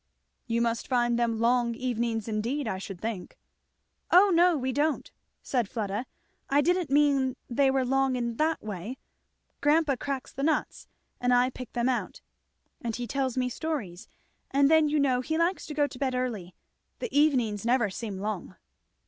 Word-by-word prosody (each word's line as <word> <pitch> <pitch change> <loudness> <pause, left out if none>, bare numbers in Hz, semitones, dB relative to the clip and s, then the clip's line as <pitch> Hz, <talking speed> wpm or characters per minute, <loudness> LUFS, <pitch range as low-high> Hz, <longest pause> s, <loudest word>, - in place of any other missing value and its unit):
"You 235 0 +1
must 230 0 -1
find 240 -2 +2
them 230 -1 +1
long 235 0 +2
evenings 235 -3 -2
indeed, 230 +6 -2
I 190 -3 -2
should 195 -2 -7
think." 215 -4 -5 0.7
"O 385 +3 +6
no 345 0 +5
we 260 -1 -1
don't," 295 +3 0 0.3
said 245 -6 -1
Fleda. 210 +1 -3 0.4
"I 280 - +4
didn't 350 +1 +2
mean 275 -2 +3 0.2
they 270 +3 +3
were 265 -1 +1
long 270 0 +2
in 235 -2 -2
that 320 +1 0
way. 210 +4 -5 0.6
Grandpa 295 -2 +3
cracks 270 -1 -4
the 275 - -5
nuts, 305 +1 -1 0.3
and 250 0 +1
I 250 +1 +4
pick 255 -2 -9
them 240 0 0
out, 255 -2 -2 0.6
and 230 -2 -3
he 245 - -4
tells 265 0 -2
me 250 -1 +1
stories; 250 - -4 0.4
and 280 +2 +3
then 315 -1 +5
you 300 0 +1
know 260 -3 +2
he 315 +5 -2
likes 340 +3 0
to 300 - -6
go 295 -1 +3
to 255 -3 -8
bed 265 -2 0
early. 220 -8 -3 0.4
The 475 - -5
evenings 250 -9 +2
never 235 -3 +2
seem 205 -1 -5
long." 195 -2 -4
255 Hz, 175 wpm, -28 LUFS, 230-285 Hz, 0.7 s, O